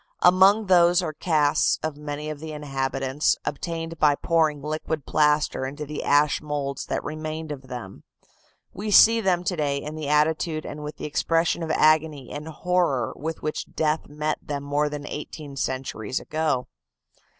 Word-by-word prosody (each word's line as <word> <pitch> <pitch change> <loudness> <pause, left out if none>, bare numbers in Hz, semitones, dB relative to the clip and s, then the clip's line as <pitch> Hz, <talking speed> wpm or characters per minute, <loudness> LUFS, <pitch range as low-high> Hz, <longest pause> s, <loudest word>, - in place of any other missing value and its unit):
Among 190 +4 +6
those 175 -1 +5
are 155 - -3
casts 150 -3 +2
of 155 -2 -2
many 150 0 -5
of 150 - -7
the 160 0 -7
inhabitants, 135 -1 -1
obtained 165 +1 -4
by 150 -2 +5
pouring 155 -2 +1
liquid 155 -1 -3
plaster 150 -2 +2
into 145 +3 -6
the 150 +1 -5
ash 145 0 +3
moulds 145 -2 -3
that - - -2
remained 155 0 -5
of 135 -2 -7
them. 120 -7 -8 0.7
We 210 +3 -4
see 225 +2 +7
them 180 -3 +1
to 180 - -1
day 145 -3 0
in 150 +2 -5
the 155 -2 -4
attitude 155 +1 +1
and 150 +1 -7
with 150 +1 -7
the - - -6
expression 165 +3 +1
of 165 - -3
agony 155 -3 +2
and 150 +2 -6
horror 160 -7 0
with 160 +2 -5
which 155 - -4
death 155 0 0
met 150 +1 -2
them 145 -1 -4
more 145 +1 0
than 145 -1 -6
eighteen 150 -1 -7
centuries 130 -3 -3
ago. 155 -5 -1
150 Hz, 165 wpm, -25 LUFS, 145-160 Hz, 0.7 s, see